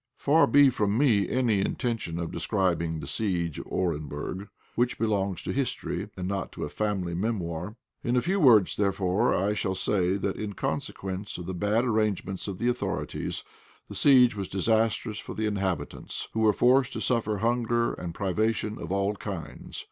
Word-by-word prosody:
Far 155 +4 +4
be 140 -1 +6
from 105 -2 0
me 120 -8 +3
any 120 -6 +2
intention 110 -5 -2
of 85 -1 -3
describing 85 -6 0
the - - -6
siege 85 0 -1
of - - -8
Orenburg, 80 +2 -3 0.3
which 120 +1 +1
belongs 100 -4 0
to - - -3
history, 135 -2 -2
and 90 -1 -3
not 100 0 -3
to - - -5
a - - -3
family 95 -2 -2
memoir. 90 -1 -2 0.3
In 120 - +1
a - - +4
few 190 +6 0
words, 115 - +6
therefore, 100 -1 +1
I 100 +3 +1
shall 100 -2 -1
say 95 0 +1
that 100 0 -2
in 105 -1 -4
consequence 95 +5 -4
of 90 - -7
the 95 - -4
bad 105 +6 +1
arrangements 110 -5 -1
of 95 -2 -4
the 120 - -1
authorities, 125 0 -2 0.5
the - - -7
siege 125 -5 +6
was 100 -2 -4
disastrous 110 +2 +1
for - - -7
the 110 - -1
inhabitants, 100 -4 -2
who 110 - -1
were 110 -1 +5
forced 125 +4 +3
to - - -3
suffer 110 -4 +1
hunger 120 +2 +1
and 85 -2 -6
privation 105 +2 -1
of - - -5
all 100 +1 +1
kinds. 100 -5 -7
105 Hz, 175 wpm, -27 LUFS, 95-115 Hz, 0.5 s, be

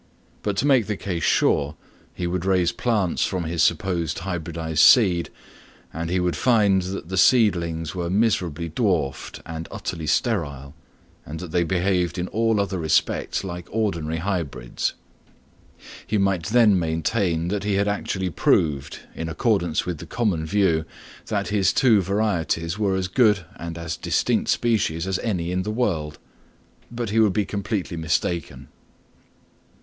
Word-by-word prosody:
But 100 -2 -2
to 135 - +1
make 130 -7 +4
the 105 -2 -2
case 90 -4 -3
sure, 75 -1 +2 0.4
he 90 - -5
would 90 0 -2
raise 95 -2 +2
plants 105 -8 0
from 90 -2 -1
his 80 0 -2
supposed 85 -2 +1
hybridised 85 -3 -3
seed, 90 -8 +5 0.6
and 80 +1 -4
he 90 +1 +1
would 90 -1 0
find 105 -6 +3
that 90 -2 -6
the 95 - -3
seedlings 85 -9 +3
were 85 -2 -3
miserably 90 -6 0
dwarfed 80 - -1
and 80 0 -6
utterly 80 -2 -5
sterile, 70 - -1 0.5
and 80 +1 -7
that 90 -3 -7
they 90 +1 +2
behaved 90 +1 0
in 90 0 -2
all 115 -1 +1
other 95 -2 -1
respects 80 +4 0
like 90 -2 -6
ordinary 85 -8 -1
hybrids. 80 -9 -3 1.1
He 105 - 0
might 95 -4 +1
then 110 -4 +4
maintain 85 +1 0
that 100 +1 -2
he 105 -1 0
had 100 +1 +1
actually 95 -2 -2
proved, 75 -3 +1
in 80 0 -5
accordance 85 -3 0
with 90 -4 -4
the - - -9
common 95 -10 -1
view, 85 -4 +2 0.4
that 100 -3 -1
his 100 -3 +2
two 110 -4 +4
varieties 90 -3 -1
were 100 -3 +1
as 95 -1 -1
good 105 -2 +3
and 85 0 -6
as 85 -1 -4
distinct - - 0
species 95 -8 +1
as 95 -1 -1
any 90 -6 -2
in 90 0 0
the 105 - -4
world; 90 -10 -1 0.7
but 120 -3 -4
he 110 - +2
would 105 -4 +4
be 105 0 +1
completely 100 -3 -3
mistaken. 80 -4 -2
90 Hz, 155 wpm, -23 LUFS, 80-100 Hz, 1.1 s, seed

